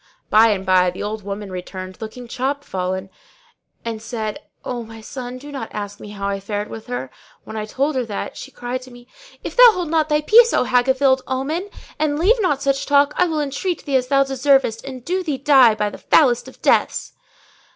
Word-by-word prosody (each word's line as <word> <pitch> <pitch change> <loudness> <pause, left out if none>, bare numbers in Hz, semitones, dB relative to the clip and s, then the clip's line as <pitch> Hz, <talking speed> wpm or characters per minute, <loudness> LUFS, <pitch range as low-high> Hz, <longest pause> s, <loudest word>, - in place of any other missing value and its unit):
By 220 +2 +7
and 195 -3 0
by 185 -1 +4
the 180 - -6
old 215 +1 -4
woman 200 0 -6
returned 185 +1 -7
looking 240 +3 -8
chopfallen,[FN#605] 195 -9 -3 0.8
and 225 -2 -4
said, 220 -2 -4 0.3
"O 245 -1 -3
my 225 0 -10
son, 250 +2 -7
do 290 +3 -10
not 265 -6 -5
ask 205 -1 -6
me 210 - -10
how 200 -1 -4
I 200 0 -2
fared 205 +1 -4
with 220 +1 -8
her! 245 - -4 0.3
When - - -9
I 215 -1 -3
told 275 +7 -1
her 255 - 0
that, 205 -2 -5
she - - -8
cried 245 +1 -5
at - - -13
me, 245 0 -15 0.4
'If - - -6
thou - - +9
hold 355 -5 -3
not 315 -1 +2
thy 300 0 +2
peace, 460 +8 +6
O - - +3
hag 250 +1 +2
of 265 +1 +1
ill 265 -1 +4
omen, 300 +9 -2 0.3
and 295 -1 +1
leave 430 +9 +3
not 290 -8 0
such 275 0 0
talk, 285 +1 +4
I 360 - +3
will 315 -2 -1
entreat 295 +5 -3
thee 280 - -1
as 255 -1 +2
thou 275 +1 +4
deservest 270 -3 +2
and 260 -2 -8
do 370 +2 0
thee 305 -6 -2
die 265 -5 +5
by 210 -1 -1
the - - -10
foulest 250 -6 +3
of - - -15
deaths.' - - +1
250 Hz, 215 wpm, -20 LUFS, 215-285 Hz, 0.8 s, thou